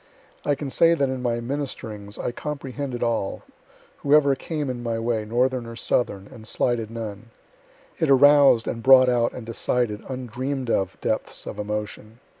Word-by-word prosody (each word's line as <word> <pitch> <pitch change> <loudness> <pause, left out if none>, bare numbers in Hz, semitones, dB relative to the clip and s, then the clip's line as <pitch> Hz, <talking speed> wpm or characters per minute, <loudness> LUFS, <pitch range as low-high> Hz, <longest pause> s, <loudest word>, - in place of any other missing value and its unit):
I 145 - +1
can 140 -1 -5
say 170 +3 +5
that 140 -4 +1
in 130 -1 -3
my 120 -1 0
ministerings 115 -6 -5
I - - -2
comprehended 135 -2 -5
all, 115 -4 -1 0.5
whoever 140 -1 +4
came 150 +1 -4
in 125 -2 -4
my 115 -1 -2
way, 115 -1 -1
northern 125 +2 0
or 115 - -8
southern, 100 -4 -1
and 110 -1 -11
slighted 115 -1 0
none. 110 -1 -7 0.7
It 160 -3 +1
arous'd 140 -3 +6
and 115 - -3
brought 130 +1 +7
out 120 -1 +2
and 125 - -8
decided 115 -1 -1
undream'd 130 0 -3
of 95 -2 -1
depths - - -2
of - - -7
emotion. 105 +2 -5
120 Hz, 160 wpm, -24 LUFS, 115-135 Hz, 0.7 s, brought